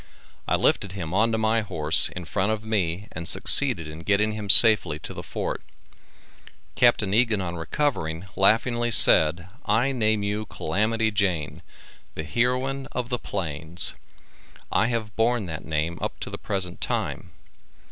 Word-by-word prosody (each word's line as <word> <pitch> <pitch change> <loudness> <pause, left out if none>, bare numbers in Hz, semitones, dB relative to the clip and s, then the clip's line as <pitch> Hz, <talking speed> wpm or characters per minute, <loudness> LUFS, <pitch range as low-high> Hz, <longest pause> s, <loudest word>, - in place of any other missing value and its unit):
I - - +1
lifted 100 -2 0
him 90 -4 -7
onto 110 +3 +1
my 110 +1 0
horse 80 -7 +3
in 90 -1 -9
front 95 +5 -1
of 110 0 -5
me 100 -2 -3
and 85 +1 -7
succeeded 80 - +2
in 75 +1 -10
getting 105 +4 0
him 105 -2 -7
safely 110 -8 +6
to 75 - -10
the - - -8
Fort. - - -6 1.1
Capt. - - +3
Egan 110 +2 +1
on 85 -2 -5
recovering, 80 - -3
laughingly 120 +4 +1
said: 85 -6 +8 0.2
"I 120 +6 0
name 110 -5 -1
you 105 +1 -4
Calamity 110 +6 -2
Jane, 95 -8 -2 0.5
the 80 - -5
heroine 125 - -2
of 125 -1 -4
the 125 -2 -3
plains." 80 -3 -3 0.8
I 110 - +1
have 115 -4 -4
borne 115 -1 0
that 80 -3 -8
name 80 +2 -3
up - - -5
to - - -6
the - - -7
present 95 -3 -5
time. 90 - -4
105 Hz, 150 wpm, -23 LUFS, 85-115 Hz, 1.1 s, said